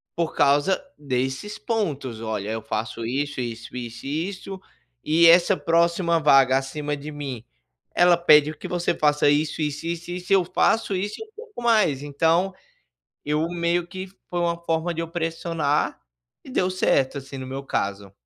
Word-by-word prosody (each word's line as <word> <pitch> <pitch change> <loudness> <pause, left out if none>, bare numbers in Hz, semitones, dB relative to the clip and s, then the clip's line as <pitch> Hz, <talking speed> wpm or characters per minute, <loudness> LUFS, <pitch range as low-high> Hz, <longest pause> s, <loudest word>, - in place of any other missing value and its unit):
por 170 -1 -2
causa 145 - +3
desses 135 - -3
pontos. 145 - -2
Olha, 110 -2 -3
eu 110 0 -3
faço 115 +1 -4
isso, 140 +2 -2
isso, 115 0 -6
isso 120 0 -7
e 160 +5 -1
isso, 195 0 -8 0.4
e 165 +2 +5
essa 175 +3 +6
próxima 170 0 +2
vaga 135 -3 +5
acima 145 +2 -3
de 150 +2 -8
mim, 135 -6 -6 0.5
ela 175 -1 +5
pede 155 -2 +5
que - - -7
você 175 -1 0
faça 150 -1 +3
isso, 150 +2 +1
isso, 150 +1 -3
isso 170 +1 -4
e 180 - -3
isso. 180 +2 -2
Eu 185 -3 +4
faço 195 +3 +1
isso 205 +3 -2
e - - -6
um 435 - -24
pouco 445 - -10
mais." 210 - +3
Então, 165 +6 +1 0.7
eu 150 +2 0
meio 170 0 0
que 190 +1 -7 0.2
foi 175 - -2
uma 170 -1 0
forma 165 +1 -1
de 165 - -3
eu 165 - -4
pressionar, 165 -3 -1 0.4
e - - -12
deu 185 -7 +1
certo, 140 -6 +1
assim, 135 0 -10
no 130 - -6
meu 135 +1 -5
caso. 100 -6 -3
155 Hz, 175 wpm, -24 LUFS, 135-175 Hz, 0.7 s, essa